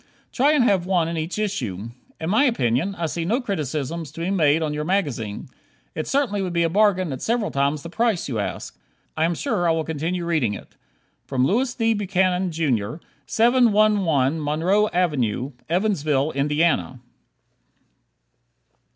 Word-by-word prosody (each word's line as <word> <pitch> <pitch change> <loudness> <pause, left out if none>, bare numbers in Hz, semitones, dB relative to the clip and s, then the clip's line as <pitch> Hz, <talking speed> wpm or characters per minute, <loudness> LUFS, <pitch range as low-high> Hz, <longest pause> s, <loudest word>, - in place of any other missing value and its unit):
Try 280 +4 +3
and 290 -5 +4
have 190 -6 +2
one 180 -4 +2
in 170 - -3
each 160 +4 -3
issue. 115 - -3 0.3
In 160 +2 -2
my 230 +8 +4
opinion, 185 - +1
I 170 - -2
see 165 +1 -3
no 220 +9 +1
criticisms 160 - -3
to 165 - -7
be 175 +3 -1
made 160 -4 +3
on 150 -1 -2
your 150 0 -2
magazine. 145 - -2 0.5
It 155 - -4
certainly 255 -8 0
would 185 -2 -3
be 170 0 +2
a 165 - +1
bargain 185 -5 +2
at 130 - -7
several 230 -2 0
times 140 +1 0
the 170 - -7
price 225 -3 0
you 120 -6 -2
ask. 100 - -4 0.4
I 160 - +2
am 170 +1 0
sure 200 - 0
I - - +4
will 160 0 -1
continue 165 +3 -3
reading 150 -11 0
it - - -11 0.6
Louis 200 - +1
D. 225 -2 +2
Buchanan, 185 -2 +1
Jr., 130 -10 -1 0.3
711 210 - +3
Monroe 180 +8 +2
Ave., 140 - 0 0.2
Evansville, 155 -6 +1
Indiana. 150 -1 0
170 Hz, 160 wpm, -23 LUFS, 150-205 Hz, 0.6 s, and